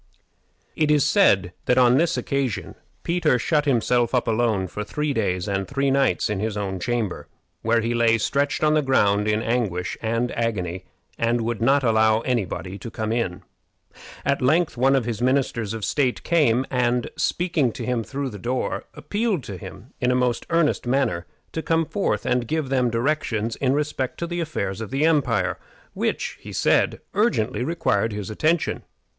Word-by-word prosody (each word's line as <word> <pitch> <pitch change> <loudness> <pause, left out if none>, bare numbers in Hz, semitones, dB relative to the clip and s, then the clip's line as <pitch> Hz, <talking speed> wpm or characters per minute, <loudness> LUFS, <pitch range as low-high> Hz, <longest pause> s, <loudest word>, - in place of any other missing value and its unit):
It 155 -1 +1
is 150 -2 +4
said 100 - +3
that 125 - +2
on 125 -1 +6
this 165 +4 +2
occasion 135 -7 -2 0.3
Peter 170 -6 +2
shut 150 +4 +1
himself 120 -2 +2
up 125 - +1
alone 110 -4 +1
for 100 +4 -5
three 150 +6 -2
days 90 -6 -1
and 95 -1 -1
three 140 0 0
nights 135 0 +2
in 105 -2 -2
his 105 0 -2
own 95 -2 -3
chamber, 115 -2 -2 0.3
where 115 +1 +2
he 115 +2 -1
lay 115 -1 +3
stretched 140 +7 0
on 155 0 +4
the 155 - +3
ground 105 -7 +2
in 105 +1 +1
anguish 105 -7 -1
and 115 +2 -1
agony, 95 -6 -2 0.3
and 115 +1 +1
would 115 0 -2
not 135 +4 +3
allow 110 -1 +3
any 120 -4 0
body 95 +3 -6
to 115 - -7
come 110 -1 -3
in. 115 -7 -2 0.8
At 140 +1 +1
length 155 +1 +2
one 135 +3 +3
of 130 -4 +1
his 115 -2 -3
ministers 125 -5 +1
of 110 -2 -3
state 130 -4 0
came, 135 -7 +3
and, 125 -1 0
speaking 160 -5 0
to - - -6
him 125 -2 -1
through 135 +2 -4
the 105 - -8
door, 125 +5 -2
appealed 205 - -1
to 100 - -7
him, 90 - -11
in 125 - +2
the 125 - +2
most 125 -2 0
earnest 165 -6 +1
manner, 120 -10 0 0.2
to 160 - -3
come 165 0 +1
forth 200 +5 -1
and 125 -1 0
give 155 -2 -1
them 130 -2 +2
directions 115 -3 -1
in 130 -1 +1
respect 145 -3 -2
to 170 - -3
the 175 +1 -4
affairs 110 - -3
of 110 - -5
the 140 +3 +1
empire, 140 -10 +1 0.3
which, - - -2
he - - -9
said, - - +2
urgently 125 - +1
required 125 -8 0
his 105 -1 -5
attention. 155 +8 0
125 Hz, 180 wpm, -23 LUFS, 110-140 Hz, 0.8 s, on